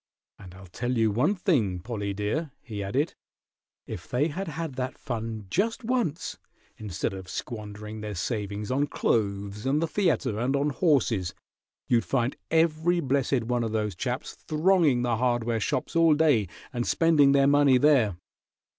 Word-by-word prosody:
"And 90 Hz, -2 st, -12 dB
I'll 95 Hz, 0 st, -12 dB
tell 120 Hz, +7 st, -3 dB
you 110 Hz, -1 st, +3 dB
one 130 Hz, -, +2 dB
thing, 140 Hz, -, +1 dB
Pollie, 100 Hz, 0 st, -4 dB
dear," 105 Hz, +11 st, -2 dB
he 105 Hz, -4 st, -6 dB
added, 130 Hz, -, -1 dB, 0.7 s
"if 85 Hz, -, -8 dB
they 140 Hz, +6 st, +1 dB
had 190 Hz, +6 st, -4 dB
had 160 Hz, -1 st, -4 dB
that 130 Hz, 0 st, -4 dB
fun 115 Hz, -3 st, -5 dB
just 225 Hz, -, 0 dB
once, 225 Hz, -, -1 dB, 0.4 s
instead 100 Hz, -3 st, -3 dB
of 95 Hz, -1 st, -8 dB
squandering 105 Hz, -2 st, -6 dB
their 105 Hz, -1 st, -5 dB
savings 105 Hz, +2 st, -3 dB
on 140 Hz, +3 st, +1 dB
clothes 100 Hz, -3 st, -1 dB
and 140 Hz, +3 st, +2 dB
the 165 Hz, -, +1 dB
theatre, 155 Hz, -, 0 dB
and 130 Hz, +4 st, +1 dB
on 145 Hz, +1 st, +1 dB
horses, 125 Hz, -, +1 dB, 0.5 s
you'd 120 Hz, -2 st, +3 dB
find 125 Hz, -1 st, 0 dB
every 165 Hz, +2 st, +2 dB
blessed 135 Hz, -4 st, +1 dB
one 120 Hz, +1 st, 0 dB
of 110 Hz, -1 st, -3 dB
those 105 Hz, -2 st, -1 dB
chaps 125 Hz, -, -4 dB
thronging 155 Hz, -5 st, +2 dB
the 120 Hz, -2 st, +1 dB
hardware 120 Hz, -1 st, 0 dB
shops 125 Hz, +7 st, -2 dB
all 165 Hz, -2 st, +5 dB
day 145 Hz, -10 st, +3 dB, 0.3 s
and 120 Hz, -1 st, -2 dB
spending 150 Hz, -4 st, +4 dB
their 140 Hz, -1 st, +4 dB
money 140 Hz, -2 st, +5 dB
there. 125 Hz, -, +3 dB
125 Hz, 160 wpm, -27 LUFS, 105-150 Hz, 0.7 s, all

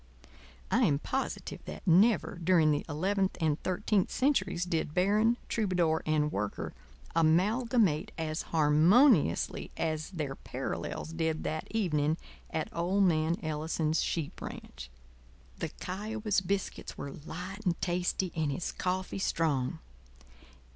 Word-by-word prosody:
I -, -, +3 dB
am 140 Hz, -, +3 dB
positive 265 Hz, -, -4 dB
that -, -, -8 dB
never 185 Hz, 0 st, +4 dB
during 165 Hz, -3 st, +5 dB
the 145 Hz, -, 0 dB
eleventh 190 Hz, +5 st, 0 dB
and 155 Hz, -3 st, +1 dB
thirteenth 190 Hz, +1 st, +1 dB
centuries 260 Hz, -10 st, +1 dB
did 160 Hz, -3 st, -2 dB
Baron, 210 Hz, +6 st, +3 dB
Troubadour, 180 Hz, -7 st, +1 dB
and 150 Hz, -1 st, +2 dB
Worker 105 Hz, +1 st, -3 dB, 0.4 s
amalgamate 190 Hz, +2 st, +3 dB
as 155 Hz, -1 st, -2 dB
harmoniously 160 Hz, -, +4 dB
as 155 Hz, -1 st, -1 dB
their 150 Hz, -7 st, -3 dB
parallels 160 Hz, +3 st, -5 dB
did 160 Hz, -1 st, -1 dB
that 155 Hz, 0 st, -3 dB
evening 155 Hz, -8 st, +1 dB, 0.3 s
at 160 Hz, -, -3 dB
old 180 Hz, +4 st, +2 dB
man 165 Hz, -2 st, +2 dB
Ellison's 155 Hz, 0 st, 0 dB
sheep 160 Hz, -4 st, -3 dB
ranch. -, -, -8 dB, 0.7 s
The -, -, -2 dB
Kiowa's 210 Hz, +2 st, -2 dB
biscuits 195 Hz, +1 st, -3 dB
were 140 Hz, -, -5 dB
light 180 Hz, +8 st, -7 dB
and 180 Hz, -4 st, 0 dB
tasty 180 Hz, 0 st, 0 dB
and 155 Hz, -3 st, 0 dB
his 145 Hz, +6 st, -3 dB
coffee 185 Hz, +1 st, -2 dB
strong. 150 Hz, -8 st, 0 dB
170 Hz, 120 wpm, -31 LUFS, 155-195 Hz, 0.7 s, during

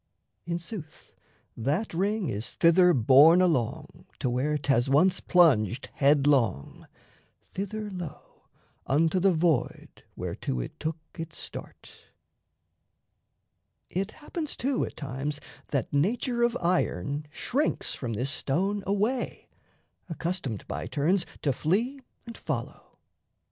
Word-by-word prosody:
In 170 Hz, 0 st, -1 dB
sooth, 170 Hz, -2 st, -9 dB, 0.4 s
that 150 Hz, -, -1 dB
ring 200 Hz, +2 st, 0 dB
is 105 Hz, +1 st, -4 dB
thither 180 Hz, +2 st, +5 dB
borne 140 Hz, +5 st, +7 dB
along 155 Hz, -11 st, 0 dB
To 125 Hz, -, -1 dB
where 145 Hz, +5 st, 0 dB
'thas 135 Hz, -3 st, +1 dB
once 180 Hz, +7 st, +4 dB
plunged 135 Hz, -, +3 dB
headlong 140 Hz, -, +2 dB, 0.6 s
thither, 205 Hz, +2 st, -5 dB
lo, 175 Hz, -6 st, -9 dB, 0.4 s
Unto 160 Hz, +6 st, +2 dB
the 195 Hz, +1 st, +4 dB
void 160 Hz, -5 st, 0 dB
whereto 65 Hz, -, -3 dB
it -, -, -6 dB
took 160 Hz, +1 st, -2 dB, 0.2 s
its 165 Hz, -1 st, -6 dB
start. -, -, -8 dB, 2.0 s
It 195 Hz, +3 st, -2 dB
happens, 305 Hz, 0 st, -5 dB
too, 265 Hz, +2 st, 0 dB
at -, -, -10 dB
times 140 Hz, +1 st, -4 dB, 0.3 s
that 140 Hz, -3 st, -2 dB
nature 235 Hz, -, +1 dB
of 235 Hz, +1 st, +2 dB
iron 150 Hz, -, 0 dB
Shrinks 260 Hz, -, -1 dB
from 120 Hz, -4 st, -4 dB
this 125 Hz, +6 st, -2 dB
stone 195 Hz, +9 st, -1 dB
away, 210 Hz, +6 st, -1 dB, 0.6 s
accustomed 165 Hz, -, -3 dB
By -, -, -4 dB
turns 175 Hz, +5 st, +1 dB, 0.2 s
to 140 Hz, -, +2 dB
flee 225 Hz, -, 0 dB, 0.3 s
and 230 Hz, -1 st, -8 dB
follow. 130 Hz, -7 st, -5 dB
160 Hz, 115 wpm, -28 LUFS, 135-195 Hz, 2.0 s, borne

